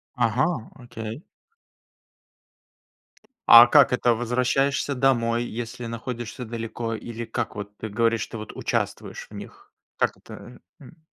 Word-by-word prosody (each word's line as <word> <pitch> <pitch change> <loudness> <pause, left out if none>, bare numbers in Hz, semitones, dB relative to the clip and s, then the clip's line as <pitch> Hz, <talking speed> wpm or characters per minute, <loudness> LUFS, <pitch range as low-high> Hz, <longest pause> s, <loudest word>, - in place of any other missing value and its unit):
Ага, 125 +2 0
окей. 120 +1 -8 2.3
А 120 +1 +12
как 130 0 +5
это- 120 -1 +2
возвращаешься 125 +4 0
домой, 120 -3 +2
если 120 +1 -6
находишься 120 +1 -6
далеко, 115 0 -4
или 120 +1 -6
как 115 +1 -4
вот 100 0 -7
ты 110 - -5
говоришь, 115 +2 +1
ты - - -9
вот 110 -1 -8
участвуешь - - -3
в - - -13
них? 410 0 -11 0.2
Как - - 0
это, - - -12 0.5
э? - - -13
М. 165 - -16
120 Hz, 130 wpm, -24 LUFS, 115-125 Hz, 2.3 s, А